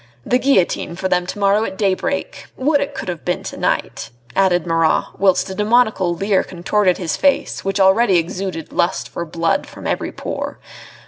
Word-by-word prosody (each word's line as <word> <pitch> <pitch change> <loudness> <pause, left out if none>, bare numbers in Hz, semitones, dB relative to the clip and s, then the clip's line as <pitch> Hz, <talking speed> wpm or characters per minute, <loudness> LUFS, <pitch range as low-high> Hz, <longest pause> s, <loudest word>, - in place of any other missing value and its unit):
The 250 - +2
guillotine 230 -9 +1
for 190 +1 -2
them 180 -1 0
to 185 - -5
morrow 200 +1 +3
at 190 -3 -5
daybreak! 200 - -1
Would 285 +2 +2
it 280 - -4
could - - -6
have 170 -6 -4
been - - -2
to - - -6
night," - - -2 0.3
added 185 -3 +2
Marat, 165 -1 +1
whilst 190 -2 +3
a - - -4
demoniacal 210 -4 +2
leer 195 +2 +1
contorted 185 +1 0
his 170 -4 -2
face 280 -1 +1
which 195 +1 -1
already 190 +1 +4
exuded 175 -1 -3
lust 175 +2 0
for 170 - -5
blood 165 +1 -1
from - - -11
every - - -2
pore. - - -5
190 Hz, 180 wpm, -19 LUFS, 175-210 Hz, 0.3 s, already